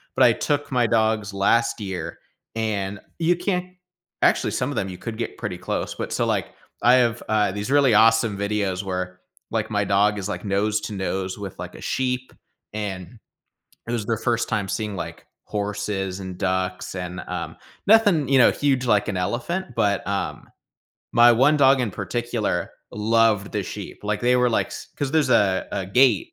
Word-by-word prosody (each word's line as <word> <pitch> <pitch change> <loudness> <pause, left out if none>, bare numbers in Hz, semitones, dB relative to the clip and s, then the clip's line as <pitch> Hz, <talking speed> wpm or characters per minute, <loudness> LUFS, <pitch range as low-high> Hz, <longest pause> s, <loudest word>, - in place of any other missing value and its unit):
but - - +4
I - - +7
took 145 0 -1
my 125 -2 +3
dogs 110 -2 +1
last 115 +5 +2
year, 95 -5 -5 0.4
and 105 -3 -2 0.2
you 170 +1 +3
can't 180 0 -2 0.5
actually, - - +3
some 125 +1 -1
of - - -5
them, 95 - -1
you 90 - -7
could 110 +3 -6
get 115 - -4
pretty - - -4
close. - - -3
But - - -5
so, - - +1
like, - - -1 0.3
I 120 +2 +7
have, 120 -2 +2
uh, 105 -2 +2
these 105 +4 -4
really 140 -4 +5
awesome 115 -1 +4
videos 100 -2 -1
where, 90 -1 -4 0.3
like, 110 -1 -1
my 105 -1 +1
dog 100 +1 +2
is, 95 - -4
like, - - -4
nose 105 +2 +1
to 105 - -5
nose 95 -1 -3
with, 100 -2 -7
like, - - -7
a - - -11
sheep, 130 0 -2 0.4
and 100 -1 -5 0.7
it - - -3
was 115 -3 -2
their 115 0 0
first 120 +1 0
time 100 -2 -1
seeing, 105 0 -3
like, 80 -1 -7 0.2
horses 100 -2 -3
and 95 -2 -7
ducks 95 -1 -2
and, 90 0 -5
um, - - -5 0.3
nothing, 205 -9 +5
you 135 - +5
know, 125 - +7
huge 135 -3 0
like 105 -4 +2
an - - -2
elephant, 120 - -2
but, 100 -1 +1
um, 100 0 -3 0.7
my 120 +1 +7
one 135 +6 +4
dog 135 -1 +5
in 115 - -1
particular 115 -4 -2 0.2
loved 110 -1 +2
the - - -1
sheep. - - -7
Like, 105 0 -1
they 125 +1 +3
were, 125 0 +3
like 115 - +1
s - - -8
'cause 140 -2 -2
there's, 155 -4 +3
uh, 100 -5 +3
a 95 - -2
gate 115 -1 +3
105 Hz, 185 wpm, -23 LUFS, 100-125 Hz, 0.7 s, I